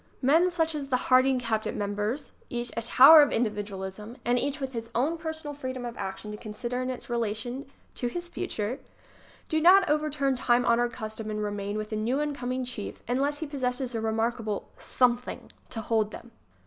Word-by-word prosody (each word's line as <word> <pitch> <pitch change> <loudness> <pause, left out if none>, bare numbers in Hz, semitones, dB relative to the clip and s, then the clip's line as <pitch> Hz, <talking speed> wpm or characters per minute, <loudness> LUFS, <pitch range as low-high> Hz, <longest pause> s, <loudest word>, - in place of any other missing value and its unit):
Men 325 +7 +5
such 325 -2 0
as 290 -2 -4
the 260 -2 +2
Harding 255 +1 +4
cabinet 225 -3 -1
members, 210 +7 -2 0.2
each 240 0 -3
a 230 - -1
tower 270 +7 +9
of 290 - +3
individualism 210 0 -3
and 245 +1 +3
each 285 +3 -2
with 270 -1 -4
his 230 -1 -5
own 285 +8 +2
per 320 -1 -4
sonal 310 -2 -7
freedom 260 -3 -5
of 240 -1 -5
action 190 +2 -5
to 210 - -6
consider 240 +3 -4
in 255 - -2
its 255 - -5
relation 235 +3 -2 0.3
to 245 - -2
his 345 +8 -4
future, 260 - -3 0.7
do 315 -1 +1
not 370 +3 +7
overturn 300 -3 +1
time 245 0 +2
honored 235 +1 +3
custom 220 -1 -6
and 210 0 -2
remain 205 0 -3
with 215 +1 -4
a - - -1
new 230 +6 0
in 295 -1 -1
coming 255 -1 -3
chief 240 -4 -6
unless 275 +4 0
he - - -1
possesses 255 -3 -2
a 225 - -2
remarkable 225 -1 -1
something 250 -1 0 0.2
to 225 - -4
hold 220 -1 +1
them. 235 +2 -11
245 Hz, 190 wpm, -28 LUFS, 220-280 Hz, 0.7 s, tower